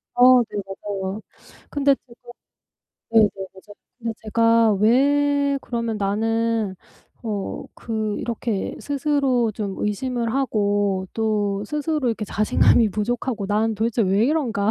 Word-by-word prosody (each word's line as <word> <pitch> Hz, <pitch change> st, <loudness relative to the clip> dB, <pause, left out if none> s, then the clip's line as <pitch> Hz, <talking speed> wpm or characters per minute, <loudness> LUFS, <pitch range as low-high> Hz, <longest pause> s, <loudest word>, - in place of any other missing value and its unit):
어. 250 Hz, 0 st, +7 dB
네. 210 Hz, -2 st, -6 dB
맞아요. 195 Hz, +1 st, -5 dB, 0.5 s
근데 280 Hz, -1 st, +2 dB
제가 245 Hz, -2 st, -21 dB, 0.9 s
네네. 220 Hz, -2 st, +6 dB, 0.3 s
맞아요. 205 Hz, +2 st, -14 dB, 0.2 s
근데 230 Hz, -2 st, -3 dB
제가 230 Hz, 0 st, +3 dB
왜 280 Hz, +6 st, +2 dB
그러면 230 Hz, -3 st, -3 dB
'나는 220 Hz, 0 st, 0 dB, 0.5 s
어 210 Hz, -4 st, -4 dB
그 220 Hz, -2 st, -3 dB
이렇게 230 Hz, -3 st, -3 dB
스스로 275 Hz, -5 st, +1 dB
좀 200 Hz, -2 st, -4 dB
의심을 235 Hz, +2 st, -2 dB
하고 205 Hz, -7 st, 0 dB
또 210 Hz, -3 st, 0 dB
스스로 300 Hz, 0 st, -1 dB
이렇게 225 Hz, -2 st, -2 dB
자신감이 215 Hz, +2 st, +3 dB
부족하고 225 Hz, +2 st, -2 dB
나는 215 Hz, +2 st, +1 dB
도대체 225 Hz, +2 st, -1 dB
왜 195 Hz, +2 st, +2 dB
이런가?' 235 Hz, -8 st, +1 dB
225 Hz, 255 characters per minute, -22 LUFS, 205-250 Hz, 0.9 s, 어